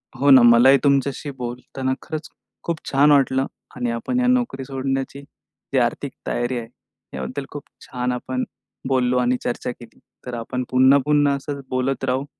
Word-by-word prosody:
हो 140 +2 +2
ना 130 -2 +9
मलाही 120 +3 +7
तुमच्याशी 140 0 +1
बोलताना 125 +2 -4
खरंच 155 0 -6 0.3
खूप 170 -1 -2
छान 145 +2 +5
वाटलं 135 -1 +3 0.3
आणि 120 -1 -2
आपण 115 - -2
या 250 - +2
नोकरी 245 - +1
सोडण्याची 135 0 -3
जी 140 - -9
आर्थिक - - -1 0.2
तयारी 120 +1 -1
आहे 115 -1 -5 0.5
याबद्दल 65 - -5
खूप 145 -1 -7 0.2
छान 125 0 -3
आपण 125 +1 -3 0.4
बोललो 125 -1 +2
आणि 125 0 +2
चर्चा 125 0 -2
केली. 120 -1 -14 0.3
तर 125 - -6
आपण 125 +2 -3
पुन्हा-पुन्हा 140 +3 +4
असंच 140 0 -6
बोलत 130 +1 -1
राहू 130 +1 -1
130 Hz, 155 wpm, -22 LUFS, 125-140 Hz, 0.5 s, ना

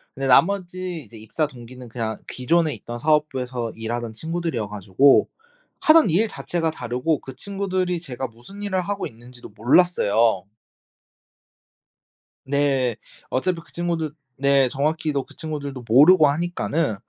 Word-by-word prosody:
근데 135 0 -2
나머지 180 +3 +2
이제 115 - -14
입사 110 +8 -2
동기는 125 -2 -11
그냥 110 -2 -3
기존에 155 +4 +1
있던 120 0 -7
사업부에서 130 -5 0
일하던 115 0 -4
친구들이어 160 -5 -3
가지고 105 +7 +3 0.5
하던 320 - +6
일 195 +8 +3
자체가 165 -2 -2
다르고 125 +3 -1
그 130 -1 -10
친구들이 185 -3 -2
제가 130 -5 -5
무슨 120 - -13
일을 190 -2 0
하고 200 +3 -3
있는지도 120 +2 -13
몰랐어요. 115 - +3 2.0
네. 135 -3 +1 0.3
어차피 170 +6 0
그 - - -17
친구들 170 -3 -2 0.3
네. 140 -1 +3
정확히도 150 0 -1
그 - - -17
친구들도 145 -5 -5
모르고 150 +7 +7
하니까는 165 -3 -1
140 Hz, 315 characters per minute, -23 LUFS, 120-170 Hz, 2.0 s, 모르고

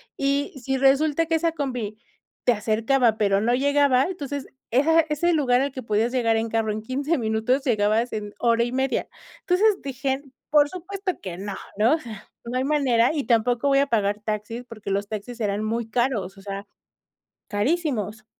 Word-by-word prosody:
Y 280 +1 0
si 265 +1 0
resulta 285 +4 +3
que 325 0 0
esa 330 0 +1
combi 245 -8 -3 0.5
te 245 - +4
acercaba, 225 +2 +2
pero 200 -1 +2
no 240 +2 +2
llegaba, 280 -1 +3
entonces, 285 -6 -4 0.2
esa 280 +7 +3
era 320 - +4
ese 345 +4 +1
lugar 260 -4 +3
al 280 0 -1
que 260 - -6
podías 225 +1 0
llegar 230 -3 +2
en 225 0 -1
carro 225 -1 0
en 215 +1 -4
15 280 +7 -1
minutos 225 +4 0
llegabas 220 0 +1
en 210 -1 -5
hora 235 -1 +2
y 240 - -2
media. 265 +1 0 0.3
Entonces, 395 +3 +2
dije: 270 0 -2 0.3
"Por 290 -1 +5
supuesto 370 +1 -4
que 180 -2 -6
no", 200 0 -5 0.2
¿no? 230 +9 +4
O - - -5
sea, 220 -7 -10 0.2
no 245 +2 -3
hay 260 - +1
manera 265 -5 +3
y 290 -3 -1
tampoco 240 +3 +2
voy 275 0 +4
a 280 - +2
pagar 205 -3 +1
taxis 215 +3 -4
porque 215 -3 -8
los 200 +1 -1
taxis 220 +3 -6
eran 205 0 -1
muy 225 +1 -2
caros, 220 -6 -1
o - - -12
sea, 200 0 -6 0.8
carísimos. 220 - -1
245 Hz, 185 wpm, -24 LUFS, 215-280 Hz, 0.8 s, Por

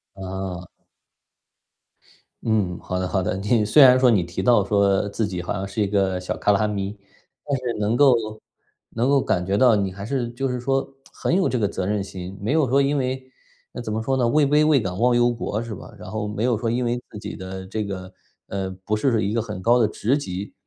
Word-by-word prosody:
啊。 95 -2 -6 1.8
嗯， 105 -6 0
好 90 - -4
的 90 - -1
好 95 +1 0
的， 90 - -1
你 105 +3 +1
虽 140 +7 +7
然 130 0 +7
说 130 -1 +5
你 100 -7 +3
提 85 +2 -5
到 110 0 +4
说 100 0 +2
自 105 +1 -1
己 90 -3 -4
好 90 - -5
像 100 -1 -3
是 100 +2 -3
一 100 - +2
个 95 -2 +1
小 90 - -4
卡 105 - +2
拉 105 +2 +2
米， 100 0 -3 0.5
但 140 -1 0
是 125 -2 -3
能 105 +3 +1
够 135 -3 +6 0.8
能 120 +4 0
够 140 - +4
感 90 0 0
觉 100 +1 0
到 120 -1 +5
你 100 -2 0
还 100 +2 -8
是 120 -1 -2
就 130 +3 -3
是 125 -1 -2
说 135 +2 -1 0.2
很 - - -1
有 190 0 +2
这 125 - -1
个 105 - +2
责 95 -2 -3
任 105 +1 0
心， 95 0 -7
没 110 +7 0
有 155 -3 +3
说 140 +2 +4
因 140 +1 +1
为， 130 0 -1 0.5
那 120 - -5
怎 110 - -5
么 110 +1 -1
说 135 +4 0
呢， 125 - +2
位 145 +5 +3
卑 150 +2 +4
未 150 -3 +4
敢 95 -4 -4
忘 120 +3 +3
忧 120 0 +4
国 115 -2 -3
是 115 -2 -6
吧？ - - -12
然 - - -9
后 105 -1 -3
没 105 +3 -2
有 120 -3 +2
说 115 +1 -1
因 125 +1 0
为 120 +1 0
自 105 - -8
己 - - -6
的 95 0 -7
这 105 +2 -3
个， 95 -2 -6 0.3
呃， 95 -1 -3 0.2
不 110 - +1
是 115 -1 +1
一 105 - -1
个 115 - +1
很 105 -4 -6
高 120 +5 +4
的 115 - +4
职 110 +5 0
级， 95 -6 -5
105 Hz, 255 characters per minute, -23 LUFS, 95-125 Hz, 1.8 s, 虽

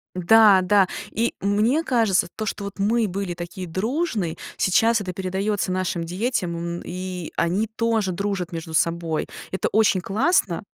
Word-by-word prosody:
Да, 200 +2 +6
да. 190 0 +4 0.2
И 230 +2 -1
мне 215 +10 +2
кажется, 220 - +2
то, 215 - -3
что 200 0 -4
вот 200 0 -7
мы 220 +3 +2
были 190 -1 -3
такие 175 +2 -7
дружные, 210 - -2 0.2
сейчас 225 +4 +3
это 185 -3 -4
передается 190 +2 -2
нашим 185 -2 -1
детям, 180 0 -2
м, 170 0 -4
и 180 -1 -5
они 190 +6 0
тоже 225 -4 +1
дружат 190 -1 -3
между 165 -1 -6
собой. 165 -1 0 0.3
Это 190 - -1
очень 210 -3 +3
классно 200 - +1
190 Hz, 150 wpm, -23 LUFS, 175-220 Hz, 0.3 s, Да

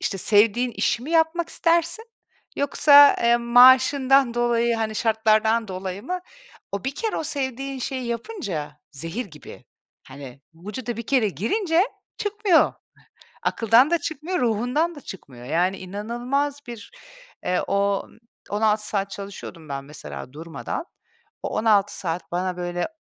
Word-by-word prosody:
İşte, 195 - -2
sevdiğin 220 +5 +3
işi 230 - 0
mi 295 - -7
yapmak 330 +1 +2
istersin? 340 +6 +1 0.5
Yoksa, 285 0 +6
eee, 235 0 +5
maaşından 260 +2 +5
dolayı, 235 -1 +1
hani, 220 -1 -2
şartlardan 220 0 +2
dolayı 185 +1 -5
mı? 365 +6 -4 0.5
O 200 -1 -4
bir 270 +1 -2
kere 445 -2 -2
o - - -3
sevdiğin 270 -2 -4
şeyi 255 0 -4
yapınca 205 - -5
zehir 165 - -5
gibi, 150 -4 -13 0.4
hani, 135 -1 -11
vücuda 210 +7 -6
bir 230 -1 -6
kere 255 -6 +2
girince 325 - +1 0.3
çıkmıyor. 415 -5 +2 0.7
Akıldan 235 +6 +4
da 340 - +4
çıkmıyor, 320 +4 -4
ruhundan 250 +9 0
da 290 - -11
çıkmıyor. 130 - -11
Yani 175 +7 0
inanılmaz 240 +9 -3
bir, 235 -4 -9 0.5
eee, 180 0 +1
o 200 0 0 0.4
16 210 0 +1
saat 200 -1 -2
çalışıyordum 195 -5 -9
ben 140 -1 -4
mesela 140 -3 -9
durmadan, 165 - -6 0.6
o - - -2
16 210 -2 +2
saat 170 -2 -4
bana, 180 +1 -2
böyle, 175 0 -2
230 Hz, 135 wpm, -23 LUFS, 195-275 Hz, 0.7 s, Yoksa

